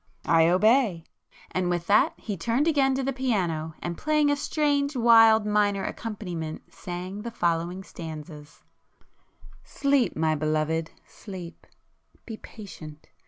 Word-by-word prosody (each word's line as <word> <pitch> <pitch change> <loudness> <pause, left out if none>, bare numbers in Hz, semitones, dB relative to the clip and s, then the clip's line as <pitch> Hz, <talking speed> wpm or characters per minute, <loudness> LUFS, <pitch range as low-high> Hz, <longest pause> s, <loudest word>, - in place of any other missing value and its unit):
"I 165 0 +4
obey!" 210 -1 +3 0.5
and 180 -1 -1
with 175 -1 -1
that 205 +3 +3
he 210 - -5
turned 230 - 0
again 275 -4 +3
to 270 - -1
the 270 +1 -1
piano, 175 -12 -1
and 175 -1 -4
playing 300 -1 +2
a - - +2
strange 285 -1 0
wild 225 -2 +6
minor 205 -2 +1
accompaniment 180 -8 -6
sang 180 +3 -6
the 235 - -5
following 175 -3 -1
stanzas: 155 -3 -10 1.0
Sleep, 280 -3 +1
my 155 0 +1
Belovëd, 155 +1 -1 0.2
sleep! 185 -5 -10 0.6
Be 225 - -6
patient! 155 -11 -11
195 Hz, 125 wpm, -26 LUFS, 165-240 Hz, 1.0 s, wild